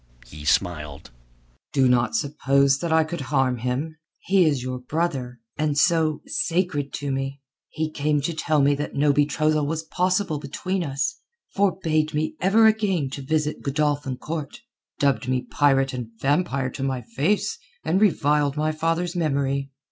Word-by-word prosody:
He 75 Hz, 0 st, -11 dB
smiled. 75 Hz, -5 st, -1 dB, 0.6 s
"Do 135 Hz, -2 st, +4 dB
not 125 Hz, -, +2 dB
suppose 140 Hz, -5 st, +2 dB
that 170 Hz, +1 st, -2 dB
I 160 Hz, 0 st, +5 dB
could 160 Hz, 0 st, -5 dB
harm 130 Hz, -2 st, +1 dB
him. 130 Hz, +7 st, -3 dB, 0.2 s
He 190 Hz, -2 st, +3 dB
is 145 Hz, -5 st, +1 dB
your 130 Hz, 0 st, -4 dB
brother, 130 Hz, -3 st, -2 dB, 0.2 s
and, 150 Hz, -1 st, 0 dB
so, 160 Hz, -1 st, +2 dB
sacred 165 Hz, -5 st, -1 dB
to 145 Hz, -1 st, -3 dB
me. 135 Hz, +1 st, -3 dB, 0.3 s
He 160 Hz, +1 st, -2 dB
came 150 Hz, 0 st, 0 dB
to 165 Hz, +4 st, -2 dB
tell 155 Hz, -2 st, +1 dB
me 145 Hz, +1 st, +4 dB
that 145 Hz, +1 st, -4 dB
no 145 Hz, +1 st, +3 dB
betrothal 150 Hz, +1 st, +1 dB
was 160 Hz, +1 st, -2 dB
possible 180 Hz, -1 st, 0 dB
between 180 Hz, +6 st, -3 dB
us, 140 Hz, -, -2 dB, 0.3 s
forbade 160 Hz, -6 st, +1 dB
me 155 Hz, +1 st, -1 dB
ever 205 Hz, +5 st, +5 dB
again 200 Hz, -10 st, +2 dB
to 140 Hz, -, -5 dB
visit 150 Hz, +2 st, -1 dB
Godolphin 145 Hz, -2 st, -1 dB
Court, 155 Hz, -, -6 dB, 0.4 s
dubbed 135 Hz, -5 st, +1 dB
me 130 Hz, -1 st, 0 dB
pirate 135 Hz, 0 st, +2 dB
and 125 Hz, -3 st, -5 dB
vampire 135 Hz, -2 st, 0 dB
to -, -, -7 dB
my 130 Hz, -2 st, -2 dB
face 140 Hz, -, -1 dB, 0.2 s
and 190 Hz, -, +1 dB
reviled 150 Hz, -7 st, +2 dB
my 155 Hz, +1 st, +1 dB
father's 165 Hz, +3 st, -1 dB
memory. 140 Hz, -4 st, 0 dB
145 Hz, 155 wpm, -24 LUFS, 135-160 Hz, 0.6 s, I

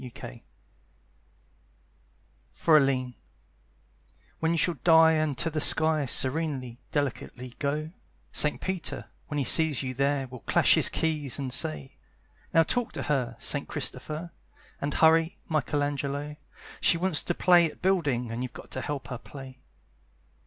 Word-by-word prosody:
Houses 125 Hz, -3 st, -10 dB, 2.1 s
(For 160 Hz, -, +3 dB
Aline) 130 Hz, -3 st, +2 dB, 1.3 s
When 160 Hz, 0 st, 0 dB
you 170 Hz, -, 0 dB
shall 165 Hz, -1 st, 0 dB
die 160 Hz, -1 st, +6 dB
and 155 Hz, -4 st, 0 dB
to 165 Hz, -, -1 dB
the 155 Hz, 0 st, -2 dB
sky 155 Hz, -2 st, +4 dB
Serenely, 130 Hz, -3 st, -1 dB
delicately 130 Hz, -3 st, -4 dB
go, 150 Hz, +2 st, -2 dB, 0.4 s
Saint 150 Hz, -, +2 dB
Peter, 190 Hz, -2 st, -4 dB, 0.2 s
when 145 Hz, -, -4 dB
he 140 Hz, -, +1 dB
sees 155 Hz, -1 st, +3 dB
you 130 Hz, -1 st, -4 dB
there, 140 Hz, +1 st, 0 dB
Will 130 Hz, -1 st, -11 dB
clash -, -, +3 dB
his -, -, +6 dB
keys 150 Hz, -5 st, -2 dB
and 135 Hz, -3 st, -4 dB
say: 75 Hz, -, -3 dB, 0.5 s
"Now 165 Hz, -, +5 dB
talk 245 Hz, +7 st, -2 dB
to -, -, -4 dB
her, 135 Hz, -5 st, -1 dB
Sir -, -, 0 dB
Christopher! 155 Hz, +3 st, -4 dB, 0.5 s
And 140 Hz, 0 st, -3 dB
hurry, 160 Hz, +1 st, +3 dB
Michelangelo! 145 Hz, -1 st, -2 dB, 0.4 s
She 170 Hz, -, +3 dB
wants 180 Hz, -3 st, 0 dB
to 175 Hz, -, -3 dB
play 175 Hz, -2 st, +4 dB
at -, -, -17 dB
building, 145 Hz, -11 st, 0 dB
And 115 Hz, +2 st, -4 dB
you've 125 Hz, -1 st, -5 dB
got -, -, -12 dB
to 130 Hz, -, -3 dB
help 135 Hz, -2 st, -5 dB
her 125 Hz, -3 st, -6 dB
play!" 130 Hz, -2 st, -12 dB
145 Hz, 145 wpm, -27 LUFS, 130-160 Hz, 2.1 s, die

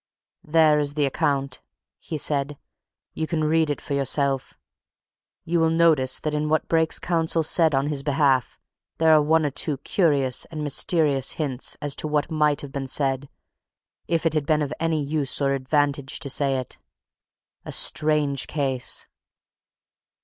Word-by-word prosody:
"There 155 Hz, -1 st, +4 dB
is 145 Hz, -1 st, -2 dB
the 150 Hz, -2 st, +2 dB
account," 135 Hz, -1 st, -1 dB, 0.4 s
he 160 Hz, -, -6 dB
said. 145 Hz, 0 st, -1 dB, 0.6 s
"You 160 Hz, -, -3 dB
can 155 Hz, -1 st, -1 dB
read 160 Hz, 0 st, +2 dB
it 145 Hz, -, -2 dB
for 145 Hz, -, -5 dB
yourself. 140 Hz, 0 st, -1 dB, 0.9 s
You 170 Hz, +1 st, 0 dB
will 165 Hz, 0 st, +3 dB
notice 160 Hz, -6 st, +3 dB
that 155 Hz, -, -2 dB
in 150 Hz, 0 st, -1 dB
what 155 Hz, 0 st, 0 dB
Brake's 160 Hz, -1 st, +2 dB
counsel 165 Hz, -1 st, 0 dB
said 160 Hz, -1 st, +2 dB
on 135 Hz, +1 st, +1 dB
his 145 Hz, -2 st, -1 dB
behalf 140 Hz, -3 st, +1 dB, 0.4 s
there 160 Hz, -1 st, +4 dB
are 155 Hz, -, +6 dB
one 160 Hz, +1 st, +2 dB
or 145 Hz, -, -1 dB
two 145 Hz, +1 st, -1 dB
curious 140 Hz, -4 st, +1 dB
and 155 Hz, -2 st, -6 dB
mysterious 145 Hz, -2 st, +1 dB
hints 140 Hz, -5 st, -2 dB
as 145 Hz, -1 st, -2 dB
to -, -, -1 dB
what 150 Hz, +1 st, -1 dB
might 150 Hz, -2 st, +1 dB
have 145 Hz, -, -9 dB
been 135 Hz, -1 st, -4 dB
said 135 Hz, 0 st, -1 dB, 0.8 s
if 165 Hz, -1 st, -1 dB
it 165 Hz, -, +2 dB
had 150 Hz, -2 st, -1 dB
been 155 Hz, -1 st, +2 dB
of 140 Hz, -, -4 dB
any 160 Hz, -2 st, 0 dB
use 145 Hz, -2 st, -2 dB
or 140 Hz, -1 st, +1 dB
advantage 140 Hz, 0 st, -1 dB
to 140 Hz, -, -1 dB
say 135 Hz, -1 st, +1 dB
it. 130 Hz, -2 st, -6 dB, 0.8 s
A -, -, -7 dB
strange 150 Hz, -3 st, +1 dB
case!" 135 Hz, -4 st, -1 dB
150 Hz, 165 wpm, -24 LUFS, 140-155 Hz, 0.9 s, are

